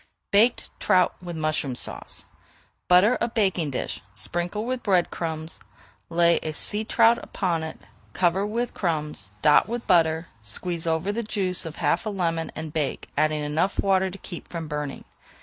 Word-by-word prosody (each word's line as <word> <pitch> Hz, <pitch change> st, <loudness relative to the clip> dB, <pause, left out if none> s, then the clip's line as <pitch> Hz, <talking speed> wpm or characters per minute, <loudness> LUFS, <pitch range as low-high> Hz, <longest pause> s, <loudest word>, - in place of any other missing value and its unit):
BAKED 225 Hz, +5 st, +3 dB
TROUT 180 Hz, -1 st, +3 dB
WITH 175 Hz, -1 st, -6 dB
MUSHROOM 155 Hz, -4 st, -1 dB
SAUCE -, -, -2 dB, 0.6 s
Butter 185 Hz, +7 st, +5 dB
a 235 Hz, -, +2 dB
baking 190 Hz, -9 st, +1 dB
dish, 130 Hz, -, -3 dB
sprinkle 175 Hz, +5 st, -3 dB
with 255 Hz, 0 st, -2 dB
bread 185 Hz, -4 st, +2 dB
crumbs, 160 Hz, -1 st, -4 dB, 0.5 s
lay 170 Hz, 0 st, +4 dB
a 155 Hz, -, -3 dB
sea 210 Hz, +7 st, +1 dB
trout 225 Hz, +1 st, +4 dB
upon 175 Hz, -5 st, -1 dB
it, 160 Hz, 0 st, -5 dB, 0.4 s
cover 185 Hz, +2 st, +2 dB
with 230 Hz, +4 st, -2 dB
crumbs, 150 Hz, -, -2 dB
dot 150 Hz, +3 st, +6 dB
with 235 Hz, +1 st, -4 dB
butter, 165 Hz, -2 st, +3 dB, 0.2 s
squeeze 165 Hz, -, -4 dB
over 165 Hz, +4 st, +1 dB
the 230 Hz, +3 st, -2 dB
juice 190 Hz, -5 st, -2 dB
of 160 Hz, -, -7 dB
half -, -, 0 dB
a -, -, +1 dB
lemon, 165 Hz, -5 st, -1 dB
and 155 Hz, -1 st, -6 dB
bake, 150 Hz, -4 st, -2 dB
adding 155 Hz, -1 st, +1 dB
enough 155 Hz, +7 st, 0 dB
water 190 Hz, -1 st, +3 dB
to 190 Hz, -, -8 dB
keep 175 Hz, -3 st, -8 dB
from 165 Hz, -2 st, -5 dB
burning. 150 Hz, -2 st, -4 dB
175 Hz, 165 wpm, -25 LUFS, 160-200 Hz, 0.6 s, dot